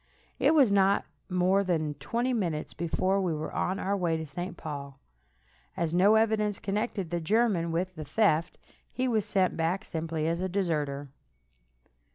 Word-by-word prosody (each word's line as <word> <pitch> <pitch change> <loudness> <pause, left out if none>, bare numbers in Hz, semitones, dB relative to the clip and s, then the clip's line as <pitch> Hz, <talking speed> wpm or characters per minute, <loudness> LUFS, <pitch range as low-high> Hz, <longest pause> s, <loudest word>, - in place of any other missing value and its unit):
It 320 - +4
was 270 -8 +5
not 200 0 +3 0.2
more 185 +2 +2
than 160 -5 0
twenty 245 +2 -1
minutes 170 -9 -2
before 185 +3 0
we 175 -4 0
were 155 +1 -4
on 185 - -1
our 200 0 -1
way 170 -4 0
to 160 - -4
St. 175 +4 -6
Paul. 140 -3 -7 0.8
As 165 -1 -1
no 195 +5 +5
evidence 215 -2 +2
connected 200 -3 -2
the 175 -1 -1
German 195 -2 +2
with 180 +3 -1
the 155 - -7
theft, 165 +1 +1 0.3
he 255 0 -1
was 220 -4 +1
sent 190 -3 +1
back 170 +6 -1
simply 160 -1 -3
as 170 +2 -1
a 185 - -1
deserter. 150 -7 -1
180 Hz, 165 wpm, -29 LUFS, 160-200 Hz, 0.8 s, was